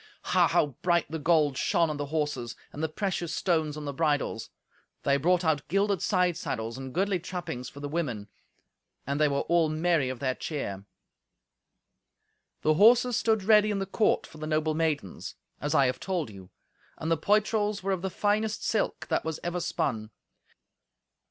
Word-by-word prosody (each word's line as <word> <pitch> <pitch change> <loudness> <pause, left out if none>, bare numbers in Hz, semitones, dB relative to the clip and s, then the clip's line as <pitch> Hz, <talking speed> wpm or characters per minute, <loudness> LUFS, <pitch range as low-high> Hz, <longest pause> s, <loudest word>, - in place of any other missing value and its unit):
Ha! - - +3
how - - +3 0.2
bright 170 -2 +2
the 160 - -3
gold 150 -3 +2
shone 170 -1 +2
on 155 -1 -3
the 145 0 -3
horses, 145 -6 -2 0.2
and 150 - -6
the 160 - 0
precious 175 -1 -2
stones 160 -5 0
on 150 - -6
the 140 - -3
bridles! 145 -7 -1 0.5
They 140 - +3
brought 175 +5 +2
out 150 -3 +1
gilded 195 +1 +1
side 180 -3 +2
saddles 115 -5 -4
and 130 0 -7
goodly 190 +4 0
trappings 175 -8 -5
for 140 - -12
the 145 - -3
women. 135 -10 -3 0.8
And 140 +2 -2
they 150 - +5
were 140 -1 0
all 170 -2 +2
merry 155 -3 +1
of 130 - -4
their 130 +1 -1
cheer. 100 -11 -5 1.8
The 155 - +4
horses 235 +7 +5
stood 220 -3 +1
ready 215 +1 +5
in 205 - 0
the 195 - -1
court 210 +3 +1
for 155 - -14
the 155 - -5
noble 155 0 +1
maidens, 155 - -2 0.2
as 150 +2 -1
I 140 - +5
have 125 - -1
told 175 - -2
you, 95 -2 -12 0.5
and 160 - -3
the - - +5
poitrals 210 +2 +1
were 195 - 0
of 190 -2 -1
the 190 - -2
finest 210 +3 0
silk - - -1
that - - +1
was 160 -1 -3
ever 175 +1 -2
spun. 110 -9 -2
160 Hz, 180 wpm, -28 LUFS, 140-185 Hz, 1.8 s, they